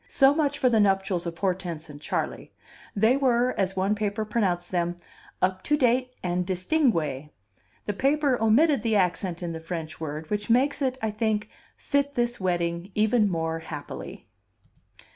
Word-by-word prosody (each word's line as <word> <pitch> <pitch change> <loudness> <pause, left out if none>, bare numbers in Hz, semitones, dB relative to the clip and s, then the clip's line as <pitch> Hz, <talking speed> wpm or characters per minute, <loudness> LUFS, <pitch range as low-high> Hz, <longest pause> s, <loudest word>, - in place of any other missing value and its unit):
So 270 0 +5
much 290 -2 0
for 260 - +2
the 230 -3 +3
nuptials 195 -3 +1
of 165 -1 -5
Hortense 180 -4 -2
and 145 -1 -11
Charley; - - -3 0.4
they 220 +6 +4
were, 250 -2 +2
as 190 -1 -1
one 190 +2 +1
paper 210 0 -2
pronounced 185 -6 -1
them, 175 -1 -1 0.5
"up 185 0 +1
to 295 - +2
date 255 -1 +1
and 180 0 0
distingue." 180 - 0 0.6
The 205 - -1
paper 280 +2 +2
omitted 265 +5 +4
the 225 -1 +1
accent 180 -2 0
in 170 -1 -3
the 160 - -5
French 160 -1 -6
word, 155 +2 -5
which 210 +1 -2
makes 265 +6 +2
it, 260 -1 0
I 220 - 0
think, 215 0 -1 0.3
fit 280 0 0
this 240 0 0
wedding 175 -1 -1
even 215 0 +3
more 165 -2 -2
happily. 155 -3 -8
200 Hz, 160 wpm, -26 LUFS, 175-245 Hz, 0.6 s, So